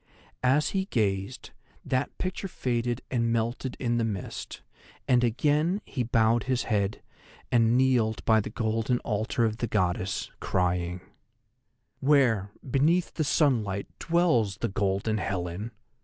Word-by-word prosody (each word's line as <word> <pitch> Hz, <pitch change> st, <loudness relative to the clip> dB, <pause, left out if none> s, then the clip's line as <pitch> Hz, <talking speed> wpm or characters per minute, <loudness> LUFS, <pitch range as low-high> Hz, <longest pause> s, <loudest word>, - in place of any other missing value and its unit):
As 130 Hz, +4 st, +3 dB
he 190 Hz, -1 st, -1 dB
gazed, 105 Hz, -, -2 dB, 0.3 s
that 130 Hz, +2 st, -1 dB
picture 185 Hz, +1 st, -3 dB
faded 120 Hz, -6 st, -2 dB
and 115 Hz, -2 st, +1 dB
melted 120 Hz, +3 st, -2 dB
in 120 Hz, -2 st, 0 dB
the -, -, +1 dB
mist, 105 Hz, -5 st, -5 dB, 0.4 s
and 125 Hz, -1 st, +4 dB
again 150 Hz, -, +2 dB
he 130 Hz, -, -3 dB
bowed 115 Hz, 0 st, +2 dB
his 130 Hz, -2 st, 0 dB
head, 105 Hz, -2 st, -1 dB, 0.5 s
and 115 Hz, -1 st, +4 dB
kneeled 125 Hz, -4 st, +2 dB
by 110 Hz, -1 st, +5 dB
the 105 Hz, -, -3 dB
golden 115 Hz, +2 st, 0 dB
altar 110 Hz, +2 st, 0 dB
of 110 Hz, -1 st, -1 dB
the 120 Hz, -, -2 dB
Goddess, 95 Hz, -2 st, -1 dB
crying: 90 Hz, 0 st, -1 dB, 1.0 s
"Where 130 Hz, -8 st, +3 dB, 0.2 s
beneath 155 Hz, +8 st, +2 dB
the 155 Hz, -, -1 dB
sunlight 115 Hz, -, +1 dB
dwells 160 Hz, -, +2 dB
the 115 Hz, -, -2 dB
golden 100 Hz, +1 st, 0 dB
Helen?" 90 Hz, +2 st, -3 dB
115 Hz, 130 wpm, -27 LUFS, 105-130 Hz, 1.0 s, by